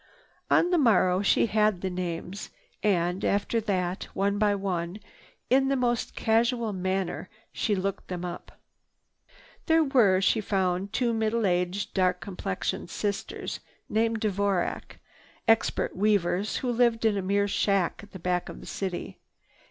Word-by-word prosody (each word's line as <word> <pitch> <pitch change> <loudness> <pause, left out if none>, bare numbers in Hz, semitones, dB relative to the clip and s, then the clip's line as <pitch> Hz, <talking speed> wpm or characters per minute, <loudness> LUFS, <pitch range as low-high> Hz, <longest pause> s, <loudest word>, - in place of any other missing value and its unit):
On 350 - +4
the 350 - +4
morrow 185 -7 +4
she 205 - +3
had 210 -4 +2
the 190 - -1
names. 180 +2 -4 0.3
And, 180 -2 +1
after 205 +3 +1
that, 185 -3 -1
one 200 +1 +1
by 205 -1 +3
one, 185 -1 -3 0.5
in 265 +1 +3
the 275 - +2
most 240 -2 0
casual 230 0 +1
manner 185 -1 -2 0.2
she 210 - 0
looked 195 0 -3
them 180 -1 -4
up. 175 0 -8 1.1
There 325 -1 +5
were, 235 -10 +4
she 200 +3 +2
found, 190 -1 -1
two 235 +1 +1
middle 220 0 0
aged, 180 +1 0
dark 185 -2 +2
complexioned 185 -1 -4
sisters 205 0 -3 0.3
named 225 0 +1
Dvorac, 200 -3 -1 0.5
expert 225 0 +2
weavers 200 0 +1
who 245 - +1
lived 235 -1 +2
in 215 -2 +3
a 200 - -1
mere 200 +2 +1
shack 195 -3 +1
at 205 - -14
the 190 - -9
back 180 0 -1
of - - -9
the - - -11
city. 185 -3 -5
200 Hz, 145 wpm, -27 LUFS, 185-220 Hz, 1.1 s, There